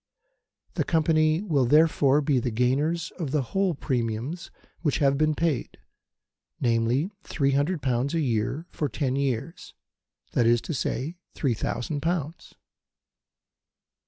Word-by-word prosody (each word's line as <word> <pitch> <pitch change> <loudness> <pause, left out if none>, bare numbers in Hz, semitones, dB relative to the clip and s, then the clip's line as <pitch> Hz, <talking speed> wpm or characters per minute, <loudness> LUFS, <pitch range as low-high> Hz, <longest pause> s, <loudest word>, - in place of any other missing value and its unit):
The - - 0
Company 155 +1 +2
will, 145 -10 +2
therefore, 150 -1 +4
be 140 -3 +2
the 125 - -1
gainers 140 +9 0
of 160 -5 -2
the 145 0 +1
whole 195 -3 +1
premiums 125 +5 -3 0.3
which 150 -5 +1
have 140 -1 +3
been 155 +1 +2
paid 155 -6 -1 0.8
namely, 120 - +1
300 145 +1 0
pounds 130 +3 0
a - - +2
year 130 +3 -1
for 150 - -2
ten 130 -2 -1
years: 140 +3 -3 0.6
that 120 - +2
is 120 0 +4
to - - -4
say, 150 +4 -2 0.2
3,000 125 +2 -2
pounds. 165 0 -3
145 Hz, 125 wpm, -26 LUFS, 125-160 Hz, 0.8 s, therefore